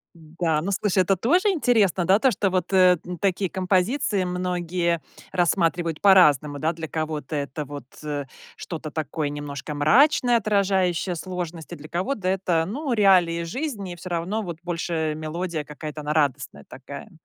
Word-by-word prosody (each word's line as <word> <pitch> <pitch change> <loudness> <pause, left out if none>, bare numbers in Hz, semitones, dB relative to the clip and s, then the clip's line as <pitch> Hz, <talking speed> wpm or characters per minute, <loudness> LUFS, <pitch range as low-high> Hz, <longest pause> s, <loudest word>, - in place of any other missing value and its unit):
Да, 160 -1 -2
ну 195 +5 -3
слушай, 195 -1 +2
это 195 +2 +2
тоже 350 - +2
интересно, 220 - +2
да, 195 +4 +4
то 260 +1 +3
что 195 0 0
вот, 185 +1 -1
э, 185 -2 +5
н 180 - -5
такие 190 -1 0
композиции 190 +4 0
многие 180 -1 -1 0.3
рассматривают 170 -2 0
по-разному, 150 -7 +5
да. 155 +3 0
Для 160 -1 -7
кого-то 155 -1 -3
это 145 +1 -4
вот, 145 0 -8 0.2
э, 145 -2 -3 0.3
что-то 155 -3 -6
такое 155 -1 -3
немножко 145 0 -6
мрачное, 245 - +4
отражающее 190 -4 +1
сложности, 175 -1 -6
для - - -12
кого-то 185 +3 -2
это, 185 -3 +1
ну, 265 - -3
реалии 180 -6 +4
жизни, 205 - -4
и - - -8
всё 185 - -8
равно, 180 +6 -2
вот 170 -4 -6
больше 165 -3 -2
мелодия 160 +1 -3
какая-то 150 +1 -7
она 150 0 -2
радостная 145 -3 -1
такая. 140 - -10
175 Hz, 155 wpm, -24 LUFS, 155-195 Hz, 0.3 s, э